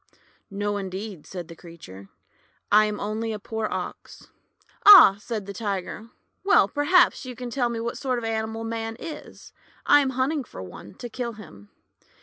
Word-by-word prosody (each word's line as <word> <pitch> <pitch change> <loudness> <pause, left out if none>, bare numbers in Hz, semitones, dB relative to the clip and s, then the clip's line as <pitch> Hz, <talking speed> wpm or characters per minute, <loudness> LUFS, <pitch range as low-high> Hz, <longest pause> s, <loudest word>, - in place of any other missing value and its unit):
"No, 205 0 -2
indeed," 190 -2 -7
said 175 -3 -7
the 165 - -11
creature, 100 - -13 0.6
"I 215 +1 +6
am 210 -1 -3
only 220 +2 -3
a - - -4
poor 220 +1 -4
Ox." - - -7 0.3
" - - -34
Ah! 380 - +10
" - - -22
said 215 -3 -5
the 200 - -7
Tiger. 200 +1 -5 0.2
" - - -49
Well, 390 - +5
perhaps 290 - +3
you 255 -2 -8
can 245 -1 -7
tell 245 -1 0
me 235 -1 -4
what 235 +1 -4
sort 255 -3 -1
of 240 - -5
an 225 - -1
animal 220 0 -3
Man 225 0 -4
is. 315 +1 -10 0.3
I 290 - +6
am 275 -2 +1
hunting 275 +3 0
for 95 - -10
one, 95 +2 -12
to 245 - -7
kill 240 0 -5
him." 105 - -14
220 Hz, 190 wpm, -25 LUFS, 195-240 Hz, 0.6 s, Ah